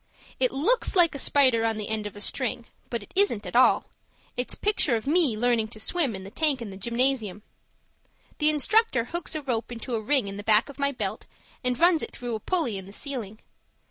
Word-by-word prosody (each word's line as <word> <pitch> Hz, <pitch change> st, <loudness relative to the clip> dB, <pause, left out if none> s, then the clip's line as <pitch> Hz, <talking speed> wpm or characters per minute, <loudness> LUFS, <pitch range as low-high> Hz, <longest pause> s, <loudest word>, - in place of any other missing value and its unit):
It -, -, +3 dB
looks 395 Hz, -, +1 dB
like 350 Hz, -3 st, +5 dB
a 280 Hz, -, -4 dB
spider 260 Hz, -5 st, +3 dB
on 225 Hz, -1 st, 0 dB
the 210 Hz, -1 st, -4 dB
end 215 Hz, -1 st, -2 dB
of 205 Hz, -, -11 dB
a 205 Hz, -, -9 dB
string, 240 Hz, 0 st, -2 dB, 0.2 s
but 235 Hz, -3 st, -3 dB
it -, -, -16 dB
isn't 365 Hz, -, +2 dB
at 180 Hz, -, -7 dB
all; 255 Hz, -, +5 dB, 0.5 s
it's 250 Hz, 0 st, -2 dB
a -, -, -25 dB
picture 400 Hz, -, +1 dB
of 220 Hz, -, -3 dB
me 295 Hz, -6 st, +2 dB
learning 235 Hz, -1 st, +2 dB
to 220 Hz, 0 st, -10 dB
swim 275 Hz, -, +1 dB
in 190 Hz, -, -7 dB
the 195 Hz, -, -10 dB
tank 290 Hz, +1 st, +1 dB
in 225 Hz, -4 st, -6 dB
the -, -, -9 dB
gymnasium. 235 Hz, -1 st, -1 dB, 1.0 s
The 300 Hz, 0 st, +5 dB
instructor 305 Hz, -, +2 dB
hooks 335 Hz, +6 st, -4 dB
a 310 Hz, -, -3 dB
rope 245 Hz, -3 st, -2 dB
into 240 Hz, +1 st, -6 dB
a 225 Hz, -, 0 dB
ring 255 Hz, 0 st, +1 dB
in 195 Hz, 0 st, -6 dB
the 205 Hz, -, -7 dB
back 215 Hz, +4 st, +4 dB
of 280 Hz, -, -12 dB
my 280 Hz, 0 st, +1 dB
belt, 265 Hz, -, -4 dB, 0.4 s
and 250 Hz, -1 st, -1 dB
runs 340 Hz, -1 st, +4 dB
it -, -, -5 dB
through 245 Hz, -1 st, -5 dB
a 220 Hz, -, -2 dB
pulley 250 Hz, -, 0 dB
in 190 Hz, -, -11 dB
the 200 Hz, -, -12 dB
ceiling. 230 Hz, -6 st, -5 dB
245 Hz, 230 wpm, -26 LUFS, 215-295 Hz, 1.0 s, like